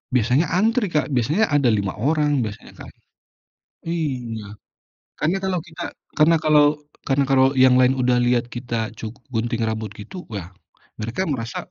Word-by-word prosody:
Biasanya 125 Hz, +7 st, +3 dB
antri, 220 Hz, +3 st, +2 dB
Kak, 150 Hz, -2 st, -1 dB
biasanya 150 Hz, -, +1 dB
ada 145 Hz, -3 st, +3 dB
5 100 Hz, -4 st, +1 dB
orang 145 Hz, +2 st, +1 dB
biasanya 105 Hz, -2 st, -7 dB
kan -, -, -9 dB, 1.0 s
iya 125 Hz, -11 st, -4 dB, 0.6 s
karena 170 Hz, +6 st, 0 dB
kalau 185 Hz, -2 st, 0 dB
kita, 160 Hz, -, -10 dB, 0.4 s
karena 155 Hz, +2 st, +5 dB
kalau 150 Hz, -1 st, +5 dB, 0.4 s
karena 140 Hz, 0 st, +2 dB
kalau 130 Hz, -1 st, +5 dB, 0.2 s
yang 130 Hz, -1 st, +6 dB
lain 130 Hz, +1 st, +4 dB
udah 125 Hz, -1 st, +2 dB
lihat 120 Hz, -1 st, +2 dB
kita 120 Hz, -1 st, -5 dB, 0.2 s
cuk 110 Hz, +2 st, -6 dB, 0.2 s
gunting 115 Hz, 0 st, -1 dB
rambut 110 Hz, -1 st, -2 dB
gitu 145 Hz, -, -9 dB
ya 95 Hz, -2 st, -6 dB, 0.5 s
mereka 115 Hz, -, -2 dB
merasa, 115 Hz, -3 st, -5 dB
130 Hz, 150 wpm, -22 LUFS, 115-155 Hz, 1.0 s, yang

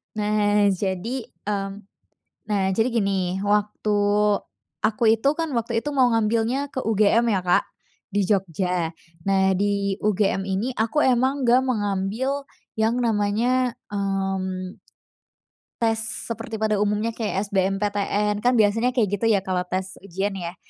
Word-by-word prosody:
Nah, 210 Hz, -1 st, +2 dB
jadi, 195 Hz, +6 st, -3 dB, 0.2 s
mmm, 200 Hz, -1 st, -2 dB, 0.8 s
nah, 200 Hz, -2 st, +1 dB
jadi 225 Hz, +5 st, +2 dB
gini, 195 Hz, -4 st, 0 dB
waktu 210 Hz, +1 st, 0 dB, 0.9 s
aku 215 Hz, +1 st, 0 dB
itu 225 Hz, +5 st, 0 dB
kan, 325 Hz, -4 st, -2 dB
waktu 235 Hz, 0 st, 0 dB
itu 295 Hz, +5 st, -3 dB
mau 255 Hz, -3 st, +4 dB
ngambilnya 230 Hz, +4 st, +1 dB
ke 265 Hz, -2 st, -5 dB
UGM 225 Hz, +2 st, +3 dB
ya, 195 Hz, -3 st, +2 dB
Kak, 180 Hz, -, +4 dB, 0.5 s
di 200 Hz, -1 st, +1 dB
Jogja. 180 Hz, -3 st, 0 dB, 0.3 s
Nah, 190 Hz, 0 st, +2 dB
di 200 Hz, 0 st, 0 dB
UGM 205 Hz, -2 st, +1 dB
ini 200 Hz, +6 st, -2 dB
aku 225 Hz, +6 st, -1 dB
emang 260 Hz, +2 st, +2 dB
enggak 245 Hz, +2 st, +5 dB
mengambil 225 Hz, +3 st, -1 dB, 0.3 s
yang 220 Hz, +2 st, +1 dB
namanya, 235 Hz, +2 st, +1 dB
mmm 190 Hz, -2 st, -2 dB, 1.0 s
tes 225 Hz, -1 st, +2 dB
seperti 225 Hz, 0 st, -5 dB
pada 215 Hz, -1 st, 0 dB
umumnya 210 Hz, +2 st, 0 dB
kayak 210 Hz, -2 st, -3 dB
SBMPTN, 205 Hz, +1 st, 0 dB
kan 245 Hz, +4 st, +2 dB
biasanya 225 Hz, +3 st, +2 dB
kayak 205 Hz, -4 st, +1 dB
gitu 225 Hz, -, +1 dB
ya 205 Hz, -4 st, +3 dB
kalau 185 Hz, -1 st, -1 dB
tes 185 Hz, +1 st, -4 dB
ujian 195 Hz, +2 st, -3 dB
ya. 175 Hz, 0 st, -5 dB
210 Hz, 135 wpm, -23 LUFS, 195-230 Hz, 1.0 s, enggak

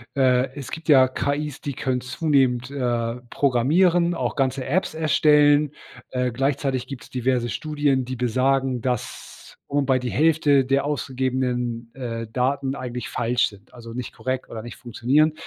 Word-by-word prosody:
äh, 130 Hz, -1 st, +3 dB
es 140 Hz, -3 st, -7 dB
gibt 160 Hz, 0 st, -7 dB
ja 130 Hz, -3 st, +7 dB
KIs, 145 Hz, +2 st, -3 dB
die 140 Hz, -, -4 dB
können 125 Hz, 0 st, -1 dB
zunehmend, 130 Hz, -2 st, +1 dB
äh, 120 Hz, -4 st, -1 dB
programmieren, 170 Hz, +8 st, +3 dB
auch -, -, -2 dB
ganze 130 Hz, -1 st, 0 dB
Apps 175 Hz, +5 st, 0 dB
erstellen. 150 Hz, -2 st, +4 dB, 0.4 s
Äh, 125 Hz, -1 st, -1 dB
gleichzeitig 135 Hz, 0 st, -1 dB
gibt's 135 Hz, -3 st, -9 dB
diverse 125 Hz, -1 st, 0 dB
Studien, 145 Hz, -3 st, 0 dB
die 130 Hz, +1 st, -4 dB
besagen, 130 Hz, +1 st, +1 dB
dass 125 Hz, -2 st, -5 dB, 0.2 s
wobei 135 Hz, -2 st, +2 dB
die 125 Hz, -1 st, -3 dB
Hälfte 150 Hz, -2 st, +3 dB
der 135 Hz, +1 st, +2 dB
ausgegebenen, 125 Hz, -4 st, -2 dB
äh, 115 Hz, -3 st, -5 dB
Daten 135 Hz, +1 st, 0 dB
eigentlich 125 Hz, -3 st, -5 dB
falsch 120 Hz, +1 st, +1 dB
sind, 105 Hz, +2 st, -18 dB
also 115 Hz, -2 st, -10 dB
nicht 125 Hz, +1 st, -6 dB
korrekt 130 Hz, 0 st, -4 dB
oder 110 Hz, -1 st, -7 dB
nicht 120 Hz, -, -9 dB
funktionieren. 135 Hz, +6 st, +1 dB
130 Hz, 145 wpm, -23 LUFS, 125-145 Hz, 0.4 s, ja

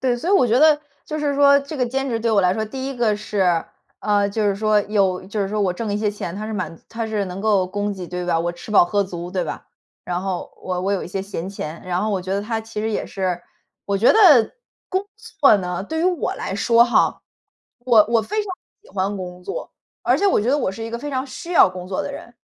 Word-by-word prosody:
对， 250 Hz, -2 st, +1 dB
所 320 Hz, +9 st, -4 dB
以 -, -, +3 dB
我 380 Hz, -11 st, +5 dB
觉 235 Hz, +2 st, +3 dB
得 305 Hz, 0 st, +5 dB, 0.2 s
就 310 Hz, -, -4 dB
是 290 Hz, -1 st, 0 dB
说 280 Hz, 0 st, +6 dB
这 280 Hz, +3 st, -7 dB
个 250 Hz, -2 st, +1 dB
兼 270 Hz, +3 st, -2 dB
职 230 Hz, -3 st, -1 dB
对 230 Hz, +1 st, 0 dB
我 210 Hz, -2 st, +4 dB
来 180 Hz, -1 st, +3 dB
说， 220 Hz, +3 st, -1 dB
第 265 Hz, +5 st, -5 dB
1 275 Hz, -, -6 dB
个 220 Hz, -3 st, +2 dB
是 190 Hz, -5 st, 0 dB, 0.4 s
呃， 205 Hz, -1 st, +2 dB
就 215 Hz, +1 st, -1 dB
是 200 Hz, -, +1 dB
说 215 Hz, 0 st, +3 dB
有 195 Hz, -3 st, 0 dB
就 205 Hz, +2 st, -3 dB
是 195 Hz, -, 0 dB
说 210 Hz, +1 st, -2 dB
我 190 Hz, -3 st, +2 dB
挣 210 Hz, +3 st, -4 dB
一 205 Hz, -, 0 dB
些 210 Hz, -1 st, 0 dB
钱， 195 Hz, -4 st, -6 dB
它 215 Hz, +2 st, -5 dB
是 220 Hz, -, -5 dB
满 185 Hz, -5 st, -4 dB
足 -, -, -25 dB
它 225 Hz, 0 st, -4 dB
是 215 Hz, -2 st, -1 dB
能 185 Hz, +1 st, -6 dB
够 200 Hz, -3 st, +2 dB
供 205 Hz, +2 st, -2 dB
给 185 Hz, -2 st, -7 dB
对 180 Hz, +1 st, -4 dB
吧， 170 Hz, -2 st, +2 dB
我 170 Hz, +1 st, -1 dB
吃 175 Hz, +5 st, -11 dB
饱 205 Hz, -, +6 dB
喝 200 Hz, +3 st, +1 dB
足 175 Hz, -2 st, -6 dB
对 185 Hz, -1 st, -1 dB
吧， -, -, -6 dB, 0.4 s
然 175 Hz, 0 st, -2 dB
后 185 Hz, -2 st, -4 dB
我 180 Hz, -1 st, -2 dB
我 195 Hz, +2 st, 0 dB
有 195 Hz, -, -1 dB
一 -, -, -8 dB
些 190 Hz, +1 st, -3 dB
闲 190 Hz, -3 st, -5 dB
钱。 165 Hz, -5 st, -6 dB
然 180 Hz, +1 st, -1 dB
后 215 Hz, -, 0 dB
我 195 Hz, -, 0 dB
觉 185 Hz, +1 st, -4 dB
得 200 Hz, -, -1 dB
它 225 Hz, +1 st, -2 dB
其 220 Hz, -1 st, -6 dB
实 220 Hz, -, -1 dB
也 215 Hz, -, -2 dB
是 185 Hz, -3 st, -2 dB, 0.4 s
我 200 Hz, -, 0 dB
觉 210 Hz, +5 st, +5 dB
得 305 Hz, -, +6 dB, 0.4 s
工 380 Hz, +1 st, -1 dB, 0.4 s
作 275 Hz, -7 st, +7 dB
呢， 180 Hz, -1 st, -3 dB
对 320 Hz, +8 st, -3 dB
于 -, -, +1 dB
我 360 Hz, -5 st, 0 dB
来 190 Hz, -, -4 dB
说 230 Hz, +3 st, +4 dB
哈， 240 Hz, -, +2 dB, 0.6 s
我 235 Hz, -4 st, +5 dB
我 230 Hz, -1 st, +3 dB
非 425 Hz, -, -2 dB
常 410 Hz, -, -7 dB, 0.3 s
喜 -, -, -20 dB
欢 200 Hz, +1 st, -1 dB
工 180 Hz, -1 st, -7 dB
作， -, -, -5 dB, 0.3 s
而 -, -, +2 dB
且 405 Hz, -, +2 dB
我 385 Hz, -, +3 dB
觉 215 Hz, -, -1 dB
得 285 Hz, +3 st, +3 dB
我 190 Hz, -, -1 dB
是 225 Hz, -, -7 dB
一 225 Hz, -, -5 dB
个 235 Hz, -, -4 dB
非 290 Hz, +4 st, -5 dB
常 260 Hz, 0 st, -2 dB
需 335 Hz, +6 st, -7 dB
要 -, -, +7 dB
工 180 Hz, -1 st, -8 dB
作 185 Hz, 0 st, -2 dB
的 -, -, -5 dB
人。 -, -, -10 dB
210 Hz, 290 characters per minute, -21 LUFS, 185-245 Hz, 0.6 s, 作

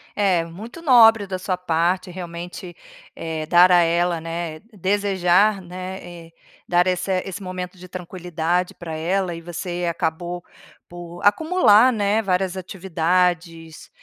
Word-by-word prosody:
É, 190 Hz, -5 st, +2 dB
muito 215 Hz, -, -10 dB
nobre 225 Hz, -7 st, +6 dB
da 185 Hz, -1 st, -3 dB
sua 185 Hz, 0 st, -2 dB
parte, 180 Hz, +1 st, 0 dB
realmente, 175 Hz, 0 st, -8 dB, 0.4 s
eh, 160 Hz, -1 st, -4 dB
dar 180 Hz, +2 st, +6 dB
a 175 Hz, -1 st, +6 dB
ela, 170 Hz, 0 st, +1 dB
né, 165 Hz, -1 st, -5 dB
desejar, 195 Hz, 0 st, +2 dB
né, 185 Hz, +1 st, -7 dB
e 170 Hz, -2 st, -12 dB, 0.3 s
dar 175 Hz, +1 st, +3 dB
essa 185 Hz, +1 st, 0 dB
esse 195 Hz, +1 st, -6 dB
momento 185 Hz, -1 st, -6 dB
de 180 Hz, +1 st, -12 dB
tranquilidade 180 Hz, -1 st, -3 dB
pra 165 Hz, -2 st, -7 dB
ela 180 Hz, +3 st, -1 dB
e 165 Hz, -, -9 dB
você 175 Hz, +1 st, -4 dB
acabou 175 Hz, +1 st, -3 dB, 0.4 s
por 175 Hz, 0 st, -10 dB
acumular, 255 Hz, -, +5 dB
né, 210 Hz, -1 st, +1 dB
várias 190 Hz, -1 st, -1 dB
atividades 175 Hz, -3 st, -2 dB
180 Hz, 135 wpm, -22 LUFS, 170-190 Hz, 0.4 s, nobre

